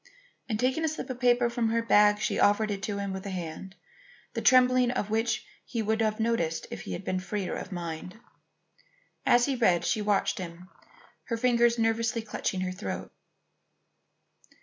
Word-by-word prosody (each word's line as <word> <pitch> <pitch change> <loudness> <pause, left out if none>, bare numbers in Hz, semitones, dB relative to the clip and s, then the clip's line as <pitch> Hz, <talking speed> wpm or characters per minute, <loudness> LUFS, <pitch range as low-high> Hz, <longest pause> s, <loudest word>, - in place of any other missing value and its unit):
And 215 -2 -1
taking 260 +6 +1
a - - +2
slip 310 -3 -4
of 250 - -7
paper 245 -1 +4
from 235 -1 0
her 230 0 +1
bag, 210 -2 +5
she - - -1
offered 210 +1 +3
it 200 -1 -3
to 200 0 -3
him 200 -1 -3
with 190 0 -5
a - - -3
hand, 180 +1 -6 0.6
the - - -2
trembling 255 -1 +5
of 210 -4 -2
which 225 0 0 0.2
he 230 -4 -3
would 220 +1 0
have 215 0 0
noted 220 -8 +1 0.2
had - - -5
he 90 -2 -5
been 185 - -2
freer 190 0 -3
in - - -5
mind. 175 +3 -6 1.1
As 240 0 +5
he 275 - 0
read, 185 -8 +2
she 220 - +1
watched 205 -1 +1
him, 175 0 -8 0.6
her 230 - -2
fingers 235 0 +3
nervously 225 0 0
clutching 190 -3 -3
her 185 0 -2
throat. 185 - -5
220 Hz, 175 wpm, -28 LUFS, 190-235 Hz, 1.1 s, bag